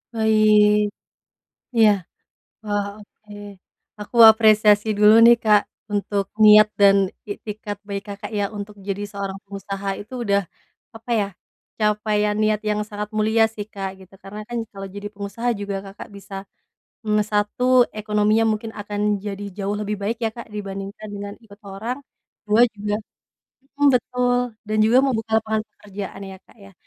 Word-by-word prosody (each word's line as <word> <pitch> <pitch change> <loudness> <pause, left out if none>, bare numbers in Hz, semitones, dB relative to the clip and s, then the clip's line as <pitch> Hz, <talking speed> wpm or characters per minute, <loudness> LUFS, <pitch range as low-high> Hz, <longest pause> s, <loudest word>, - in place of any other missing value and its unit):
Baik. 215 -1 +4 0.9
Iya. 220 -2 +6 0.7
Wah 205 -1 -1
oke. 210 0 -18 0.7
Aku 210 +3 -7
apresiasi 215 -1 +4
dulu 210 +1 +7
nih 235 0 +8
Kak, 210 -1 +5 0.3
untuk 200 -1 -1 0.2
niat 215 0 +8
dan 200 0 +7 0.4
iktikad 205 -1 -6
baik 200 0 -4
Kakak 205 +1 -7
ya - - +1
untuk 205 +1 -7
jadi 200 +1 -2
seorang 195 -1 -5
pengusaha 195 0 -6
itu 215 +5 -13
udah, 200 -1 +2 0.5
apa 225 +2 -8
ya, 200 - 0 0.5
capaian 210 0 +1
niat 215 -1 +2
yang 210 0 0
sangat 210 0 -5
mulia 220 +1 +3
sih 205 -1 -5
Kak 195 -1 -4
gitu. 190 0 -17
Karena 205 +2 -9
kan 240 - -3
kalau 195 -1 -8
jadi 205 0 -5
pengusaha 200 +4 -4
juga 200 -1 -3
Kakak 195 +1 -10
bisa, 195 0 -13 0.7
mmm, 210 -1 +1
1 210 +4 0 0.4
ekonominya 210 +1 +2
mungkin 220 +1 -4
akan 205 0 -5 0.3
jadi 205 0 -5
jauh 200 +1 -2
lebih 210 0 -2
baik 225 +3 -1
ya 225 - +1
Kak 235 - -9
dibandingkan 195 +1 -6
dengan 200 0 -6
ikut 205 -1 -16
orang. 230 +7 -4 0.5
2 215 +3 +4 0.2
juga 205 0 -3 0.8
mhm, 290 - +2
betul 250 0 +1 0.3
dan 215 0 -1
juga 235 +3 +4
mau 270 - +2
buka 220 0 -6
lapangan 220 -1 -1
pekerjaan 200 -1 -8
ya 190 - -10
Kak - - -22
ya. 200 - -15
210 Hz, 150 wpm, -22 LUFS, 200-215 Hz, 0.9 s, nih